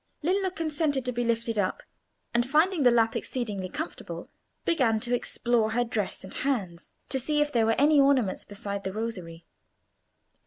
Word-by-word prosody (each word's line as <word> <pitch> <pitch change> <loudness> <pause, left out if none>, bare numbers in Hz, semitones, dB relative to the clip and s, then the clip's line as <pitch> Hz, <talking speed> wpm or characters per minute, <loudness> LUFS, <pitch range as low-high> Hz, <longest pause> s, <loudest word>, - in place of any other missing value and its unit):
Lillo 380 +3 +2
consented 310 -5 -1
to 250 - +1
be 240 0 -1
lifted 230 -1 0
up, 185 -2 -1 0.5
and, 240 0 +3
finding 325 +4 +3
the 250 - +7
lap 230 -1 +3
exceedingly 210 -7 -3
comfortable, 315 - -6 0.3
began 255 -10 +2
to 240 +2 -2
explore 235 -2 +1
her 245 +1 +2
dress 225 -4 -3
and 190 - -7
hands, 200 -11 -2 0.2
to 265 - 0
see 295 +4 0
if 295 0 +2
there 230 -4 +2
were 225 - +3
any 290 0 +5
ornaments 265 -8 +2
beside 200 -1 -5
the 190 - -3
rosary. 185 -7 -5
240 Hz, 165 wpm, -27 LUFS, 215-285 Hz, 0.5 s, the